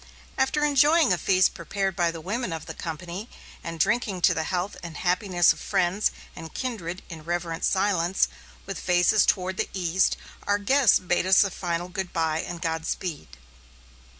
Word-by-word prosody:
After 270 +3 +1
enjoying 295 - +4
a - - +1
feast 185 +2 +3
prepared 195 -2 -3
by 175 -1 +2
the 165 -1 -6
women 205 +4 -3
of 160 -1 -5
the - - -7
company, 175 +6 -6 0.3
and 165 -1 -6
drinking 205 -1 +1
to - - +5
the 160 - -2
health 180 +3 -2
and 170 -3 -8
happiness 180 -1 +3
of - - -14
friends 185 +3 +1 0.3
and 160 -1 -9
kindred 190 -9 -5
in 160 -3 -9
reverent 170 0 -3
silence, 190 -2 +2 0.4
with 195 -1 -5
faces 180 +3 +3
toward 185 -1 0
the - - -1
east, 180 0 +1 0.3
our 205 0 +3
guests 245 +3 +4
bade 180 0 0
us 190 +3 +6
a 200 - -2
final 175 -1 -3
good 185 0 -5
bye 160 -1 0
and 175 -2 -6
godspeed. 160 - -3
180 Hz, 170 wpm, -26 LUFS, 170-200 Hz, 0.4 s, us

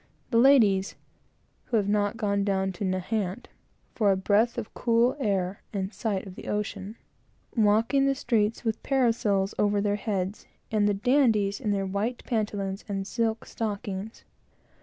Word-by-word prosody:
The 230 - +4
ladies 220 -8 +5 0.7
(who 235 - 0
have 200 -2 +1
not 205 +1 +1
gone 200 -2 0
down 190 -1 0
to 185 - -6
Nahant, 190 +3 -2 0.4
for 210 -4 +3
a 190 - +2
breath 210 +5 +2
of 225 -3 -5
cool 235 +1 +2
air, 195 -5 -1
and 195 0 -3
sight 205 -4 -2
of 190 - -9
the - - -10
ocean) 210 0 -3 0.6
walking 225 +5 +3
the 275 - +2
streets 225 -3 0
with 225 -1 -2
parasols 225 -7 +1
over 205 0 +2
their 205 0 0
heads, 195 -2 -3 0.2
and 210 -1 +3
the 205 - +1
dandies 215 -3 +2
in 225 - -3
their 200 -1 0
white 205 +6 -2
pantaloons 205 -4 -2
and 195 -1 -2
silk 225 +1 -1
stockings! 205 -1 -5
210 Hz, 155 wpm, -27 LUFS, 195-230 Hz, 0.7 s, ladies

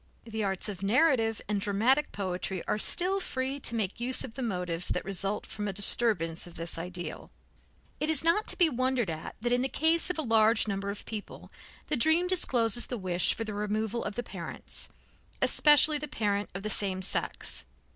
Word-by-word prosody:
The 220 -1 -4
arts 195 0 -2
of 195 -3 -6
narrative 225 0 +2
and 205 -1 -1
dramatic 230 +9 +1
poetry 185 -1 -4
are 210 - 0
still 370 - +2
free 265 -5 -3
to 235 - -1
make 210 -2 -2
use 250 +2 0
of 240 - -8
the 265 - -7
motives 180 -6 -2
that - - -2
result 195 +1 -2
from 210 0 -5
a 200 - -3
disturbance 195 -5 +3
of 175 - -14
this 165 0 -4
ideal. 175 -1 -6 0.7
It 305 - -1
is 315 - +2
not 335 +6 +2
to - - +4
be 350 - +5
wondered 255 - 0
at 160 0 -7
that 240 +1 -1
in 245 0 +2
the 265 - -1
case 325 +5 +3
of 360 - -2
a 315 - -1
large 225 -2 +3
number 200 -1 -3
of 200 - -7
people 215 -2 -8 0.3
the - - -1
dream 315 +7 +3
discloses 240 - +2
the 245 - -4
wish 180 -3 +1
for 225 - -4
the 215 -1 -6
removal 215 +2 -2
of 205 - -5
the 245 - -3
parents, - - -8 0.5
especially 295 0 +5
the 300 - -5
parent 205 -4 -2
of 195 - -6
the 215 - -3
same 190 -2 0
sex. - - -3
220 Hz, 195 wpm, -29 LUFS, 195-260 Hz, 0.7 s, be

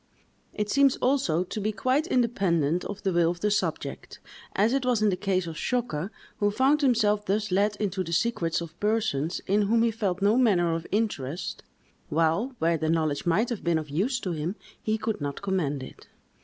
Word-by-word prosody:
It 210 -1 -1
seems, 275 -1 +4
also, 260 - +1
to 195 +3 -5
be 215 +2 0
quite 260 - 0
independent 180 - +1
of 205 0 -6
the 190 - +1
will 170 -1 +3
of 175 0 -4
the 210 - +1
subject, 210 - -3 0.4
as 215 +5 +3
it 275 -1 +1
was 245 -4 +1
in 215 - +4
the 190 - +1
case 185 -1 0
of 165 -2 -6
Zschokke, 225 -9 -1 0.3
who 205 - +2
found 265 +8 +2
himself 215 -6 +2
thus 210 +1 0
let 205 +3 +2
into 200 -2 -2
the 170 - -7
secrets 175 -3 0
of 170 0 -9
persons 205 -8 0
in 205 +2 +2
whom 225 +3 +3
he 230 - +2
felt 200 -5 -2
no 205 +4 +3
manner 175 -9 +3
of 165 0 -4
interest, 180 - -2 0.5
while, 165 - +1
where 165 -4 +1
the 160 0 -1
knowledge 155 -2 0
might 210 +8 +2
have 235 -5 -4
been 170 -1 +2
of 155 -2 -5
use 230 - 0
to 185 - -3
him, 165 +4 -3 0.3
he 215 0 0
could 220 -5 -3
not 145 +5 -4
command 155 -9 -1
it. - - -12
200 Hz, 200 wpm, -27 LUFS, 170-225 Hz, 0.5 s, seems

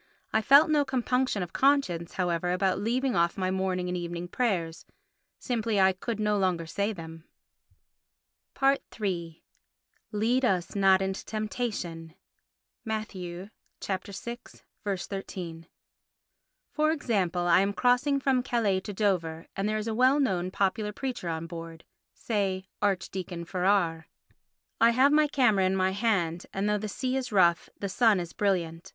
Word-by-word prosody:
I 220 - +3
felt 285 +7 +6
no 295 -1 +4
compunction 255 -5 0
of 175 - -8
conscience, 260 -12 +2
however, 175 -1 0
about 190 +1 +1
leaving 245 +4 0
off 170 0 +2
my 185 -1 0
morning 185 -1 -1
and 180 - -2
evening 175 0 -4
prayers—simply 215 +3 -3
I 190 0 +5
could 215 +4 -4
no 210 -1 +1
longer 180 -3 0
say 200 +6 -1
them. 165 -4 -9 1.7
iii 170 -6 -3 0.7
Lead 235 +5 +1
us 185 -8 +1
not 195 -1 +4
into 190 0 -3
temptation 205 -7 -4 0.7
(Matt. 220 -1 -3
vi. 180 +1 -7 0.3
13). 195 -4 -6 1.0
For 310 0 +2
example; 200 - 0
I 175 0 +5
am 195 +1 +2
crossing 250 +6 +2
from 265 -2 +2
Calais 230 -7 +1
to 205 +2 -7
Dover 180 -5 -1
and 195 +2 -1
there 215 - 0
is 215 +1 -4
a 225 - -1
well 255 +5 +4
known 185 -9 0
popular 205 +3 0
preacher 245 -6 -4
on 160 0 -3
board, 165 -1 -8 0.3
say 195 -4 -1 0.2
Archdeacon 185 -3 -2
Farrar. 180 -3 +1 0.7
I 230 - +6
have 260 +4 +4
my 300 0 +4
camera 240 -9 +3
in 190 +1 +1
my 190 0 +2
hand 190 -5 0
and 195 +1 -1
though 210 0 +1
the 215 +1 -4
sea 255 +5 -2
is 255 -2 -2
rough 175 -4 +3
the 200 - -2
sun 210 +1 +3
is 175 -1 -6
brilliant. 170 -5 -1
195 Hz, 145 wpm, -28 LUFS, 175-230 Hz, 1.7 s, felt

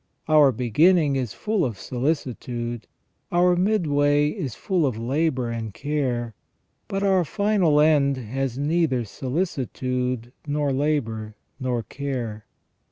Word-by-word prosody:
Our 150 -3 +6
beginning 145 - +3
is 125 -5 -2
full 210 -4 -1
of 115 -7 -2
solicitude, 120 -3 -3 0.4
our 175 +1 +4
midway 150 -7 +2
is 145 - -4
full 180 -6 0
of 120 -4 -2
labour 130 0 0
and 115 -3 -5
care, 130 -5 -2 0.5
but 195 0 -2
our 190 -2 +3
final 190 -3 +2
end 145 -3 +4
has 130 +1 -3
neither 145 -3 +1
sohcitude, 125 - -2 0.2
nor 145 -1 0
labour, 115 -7 -1 0.2
nor 125 -3 -1
care. 115 -4 -5
140 Hz, 115 wpm, -24 LUFS, 120-155 Hz, 0.5 s, Our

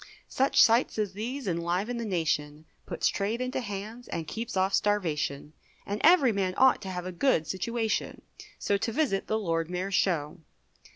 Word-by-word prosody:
Such 270 +1 +1
sights 230 +2 +5
as 210 -3 -1
these 240 +5 -5
enliven 180 +7 -1
the 235 - -3
nation, 155 -5 -1 0.2
Puts - - 0
trade 210 +4 -1
into 255 0 -2
hands, 215 +1 -6
and 160 -2 -4
keeps 230 -2 -5
off 190 +1 +1
starvation; 155 -8 0 0.3
And 205 +1 -4
every 315 -7 +6
man 190 -3 -1
ought 260 0 +5
to 190 - -6
have 180 -1 -5
a 185 - -4
good 180 - +1
situation, 220 +6 -2 0.3
So 200 - 0
to 225 +3 -2
visit 250 -7 0
the 220 - 0
Lord 165 -5 -1
Mayor's 185 +2 -3
show. 170 -4 0
200 Hz, 170 wpm, -28 LUFS, 175-230 Hz, 0.3 s, every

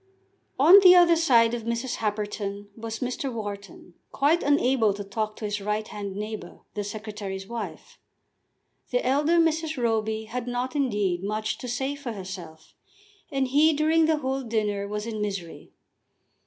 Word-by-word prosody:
On 340 +9 +9
the 365 -2 +8
other 345 -1 +6
side 240 -8 +4
of 240 - -2
Mrs. 235 +2 -2
Happerton 205 -1 -3
was 225 0 -6
Mr. 255 +2 -2
Wharton, 200 -5 -7 0.2
quite 305 +5 +2
unable 255 -7 +2
to 205 - -5
talk 215 +2 -3
to 215 - -6
his 205 0 -2
right 210 +1 -2
hand 200 -2 -6
neighbour, 210 -3 -6
the 205 - -3
Secretary's 205 -2 -6
wife. 235 0 -7 0.9
The - - 0
elder 295 +6 +3
Mrs. 320 -2 +1
Roby 220 -2 0
had 235 +2 -5
not, 245 +3 -3
indeed, 205 -10 0
much 215 +1 -2
to 250 - -6
say 265 +3 -2
for 285 -5 -6
herself, 185 -5 -9 0.6
and 270 -2 0
he 305 +4 +5
during 315 +2 +3
the 320 -1 +2
whole 270 -2 -2
dinner 210 -4 -1
was 210 +1 -4
in 220 -2 -4
misery. 195 -5 -5
225 Hz, 155 wpm, -26 LUFS, 205-270 Hz, 0.9 s, On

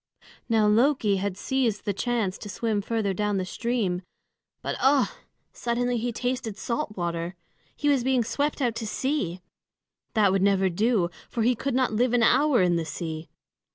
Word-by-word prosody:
Now 220 -2 +4
Loki 220 -1 +3
had 195 -1 -2
seized 240 -3 0
the 205 - 0
chance 220 -2 -1
to 205 - -8
swim 215 0 -1
further 215 -2 -1
down 210 +1 0
the 185 - -1
stream. 205 -3 -1 0.6
But - - -2
ugh! 270 0 +4 0.4
suddenly 245 +1 -1
he 240 +2 -1
tasted 245 -2 -3
salt 235 -3 -3
water. 170 0 -2 0.4
He 290 - -2
was 275 -4 +3
being 260 -1 +2
swept 285 +5 -1
out 240 -2 +1
to 225 - -4
sea! 210 - -2 0.7
That 205 -3 +4
would 195 0 +2
never 195 -1 +3
do, 195 -1 +1 0.2
for 230 - -1
he 245 +2 +4
could 255 +2 -2
not 255 -3 +2
live 240 +2 +2
an 240 -2 +4
hour 260 -2 +4
in 175 -1 +3
the 165 - -2
sea. 160 0 -5
225 Hz, 175 wpm, -26 LUFS, 195-245 Hz, 0.7 s, Now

